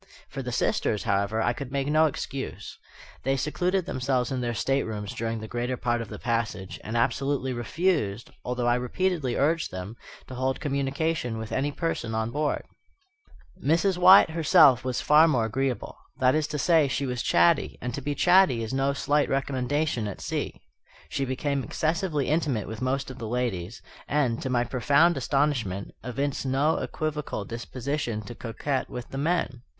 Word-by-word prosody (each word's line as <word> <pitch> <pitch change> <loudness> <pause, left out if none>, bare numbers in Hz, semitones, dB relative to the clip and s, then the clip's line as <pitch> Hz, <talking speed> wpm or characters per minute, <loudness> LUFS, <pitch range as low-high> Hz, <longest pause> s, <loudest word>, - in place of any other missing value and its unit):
For - - -5
the - - -4
sisters, 105 - 0
however, 100 +1 0
I 120 - +2
could 135 0 -7
make 140 -1 -1
no 155 +2 +4
excuse. 135 -2 -5 0.5
They 135 +1 0
secluded 180 +6 0
themselves 130 -1 -1
in 130 -1 -1
their 120 -1 -2
staterooms 110 -5 -1
during 115 0 -3
the 110 - -7
greater 120 +2 -2
part 120 -1 0
of 115 - -7
the - - -7
passage, 115 -5 -2
and 110 +2 -3
absolutely 130 +2 0
refused, 120 - -1
although 125 0 -2
I 120 - +4
repeatedly 150 -1 -1
urged 160 +4 +1
them, 95 +4 -7 0.3
to - - -10
hold 130 +1 -1
communication 140 -2 -1
with 110 -1 -6
any 140 +2 0
person 140 -8 -2
on 110 +1 -1
board. 150 +2 -1 1.0
Mrs. 175 +4 +2
Wyatt 185 -1 +8
herself 150 -5 +5
was 130 -2 -2
far 155 +2 +6
more 125 -8 +2
agreeable. 130 +3 -2 0.2
That 130 0 +4
is 155 -1 +1
to 150 - -4
say, 160 0 +4
she 135 +1 -1
was 125 -2 -2
chatty; 85 0 +3
and 125 0 -4
to 140 - -4
be 145 +2 -2
chatty 180 -11 +4
is 110 - -5
no 135 +1 +1
slight 145 +1 +1
recommendation 135 -2 0
at 100 - -6
sea. - - -4 0.5
She 135 - -1
became 135 +1 -1
excessively 155 - -1
intimate 145 - 0
with 110 +1 -7
most 130 +1 -1
of 130 - -11
the 115 - -5
ladies; 115 -4 -3 0.2
and, 130 -5 +1
to 130 - -3
my 120 -1 +2
profound 145 +8 +3
astonishment, 130 -8 0
evinced 135 +3 -2
no 135 +4 +1
equivocal 150 -9 -3
disposition 120 0 -4
to 120 - -8
coquet 130 +4 -3
with 125 0 -7
the 135 - -5
men. 150 -5 0
130 Hz, 170 wpm, -26 LUFS, 120-150 Hz, 1.0 s, Wyatt